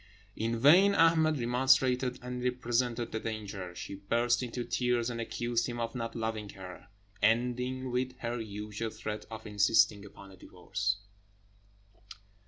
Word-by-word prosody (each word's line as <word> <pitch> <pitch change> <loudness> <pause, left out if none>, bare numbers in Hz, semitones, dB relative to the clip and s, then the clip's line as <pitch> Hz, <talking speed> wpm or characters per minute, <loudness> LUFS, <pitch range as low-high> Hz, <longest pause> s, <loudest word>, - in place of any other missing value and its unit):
In 115 +1 -1
vain 180 - +6
Ahmed 160 -2 +4
remonstrated 125 +1 +2
and 125 0 -5
represented 120 -1 0
the 110 - -2
danger; 100 -5 -5
she 95 - -6
burst 120 +5 +1
into 125 0 -3
tears, 125 -1 0
and 115 -1 -4
accused 120 +1 -1
him 120 -1 -5
of 115 0 -2
not 115 -2 -4
loving 110 -2 -3
her, 95 -2 -10 0.3
ending 125 +3 +1
with 125 +1 -2
her 120 -1 -3
usual 105 +1 -5
threat 105 -1 -6
of 110 0 -8
insisting 105 0 +3
upon 100 -1 -13
a 95 - -15
divorce. 100 +3 -3
115 Hz, 140 wpm, -31 LUFS, 105-125 Hz, 0.3 s, vain